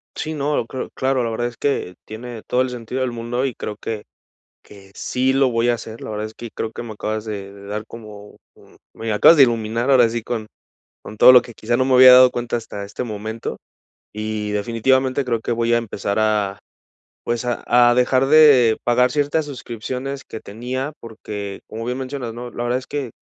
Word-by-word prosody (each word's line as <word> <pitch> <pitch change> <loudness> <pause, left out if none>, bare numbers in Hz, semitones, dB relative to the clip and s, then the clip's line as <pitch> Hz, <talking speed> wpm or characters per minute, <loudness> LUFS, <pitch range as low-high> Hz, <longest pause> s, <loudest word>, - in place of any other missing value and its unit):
Sí, 155 - -4
¿no?, 145 -4 -1
cre 130 +3 -6
claro, 130 -1 0
la 115 - -1
verdad 120 +2 -2
es 120 - -8
que 135 -10 -2
tiene 115 +1 -8
todo 125 - +1
el 130 - 0
sentido 125 +1 -5
del 130 -2 -1
mundo 120 +2 -3
y 135 - -2
creo 105 - -6
que 105 -1 -5 0.6
que 100 -1 -16
sí 130 +1 0
lo 135 -1 +3
voy 115 0 +1
a 120 - +3
hacer, 115 -1 -9
la - - -7
verdad 105 0 -3
es 110 - -9
que 120 0 -9
creo 110 - -4
que - - -6
me 115 - -8
acabas 110 +1 -3
de 100 -2 -6
de 100 0 -13
dar 105 +1 -4
como, 105 -3 -12 0.2
un - - -21 0.2
me 115 -1 -4
acabas 150 +10 +7
de 140 - +9
iluminar 115 0 0
ahora 125 -4 +5
sí 115 +1 -3
con 115 -3 -4 0.6
con 105 - -10
todo 125 - +8
lo 125 -2 +8
que 120 - -11
quizá 120 +3 -1
no 130 - +2
me 130 0 +2
había 130 0 +9
dado 125 0 +8
cuenta 120 -1 -3
hasta 105 -3 -6
este 100 +5 -5
momento 110 0 -5 0.6
y 105 0 -3
definitivamente 130 +5 +1
creo 115 -3 -1
que 120 - -3
voy 115 0 +1
a - - +5
empezar 100 -3 -3
a, 105 -2 0 0.7
pues, 120 0 -2
a 120 -1 -3 0.3
a - - +3
dejar 130 +2 +3
de 140 -6 +6
pagar 125 +1 +3
ciertas 145 +3 0
suscripciones 130 0 -6
que 110 - -8
tenía 125 +7 -5
porque 105 -3 -7
como 115 +1 -6
bien 125 +2 -3
mencionas, 130 -3 -5
¿no? 120 +1 -7
La 120 - -5
verdad 120 +1 0
es 130 - -11
que, 140 -5 -4
120 Hz, 215 wpm, -20 LUFS, 110-130 Hz, 0.7 s, de